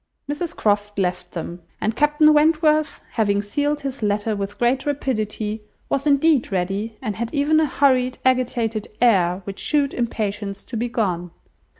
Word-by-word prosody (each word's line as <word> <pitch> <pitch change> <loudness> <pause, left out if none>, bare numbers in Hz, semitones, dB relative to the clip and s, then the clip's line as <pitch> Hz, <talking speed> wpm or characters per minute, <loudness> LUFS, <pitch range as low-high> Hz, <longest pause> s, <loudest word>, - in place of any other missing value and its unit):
Mrs 295 +4 -3
Croft 205 -1 0
left 180 -2 -2
them, 175 +1 -6 0.2
and 220 +1 -1
Captain 295 +1 +4
Wentworth, 305 0 +3
having 205 -3 +1
sealed 290 +8 -1
his 275 -2 -5
letter 210 +1 0
with 200 0 -5
great 250 +2 +1
rapidity, 215 -6 -2 0.3
was 275 +2 0
indeed 285 -3 +3
ready, 195 +4 -2
and 215 -5 -3
had 235 0 -3
even 295 +2 +3
a 315 - +2
hurried, 255 -2 +2
agitated 240 -4 +1
air, 190 -6 +3
which 195 +1 -7
shewed 285 -2 +1
impatience 205 -4 -3
to 245 - -8
be 240 +2 -1
gone. 180 -7 -1
230 Hz, 155 wpm, -22 LUFS, 205-285 Hz, 0.3 s, Captain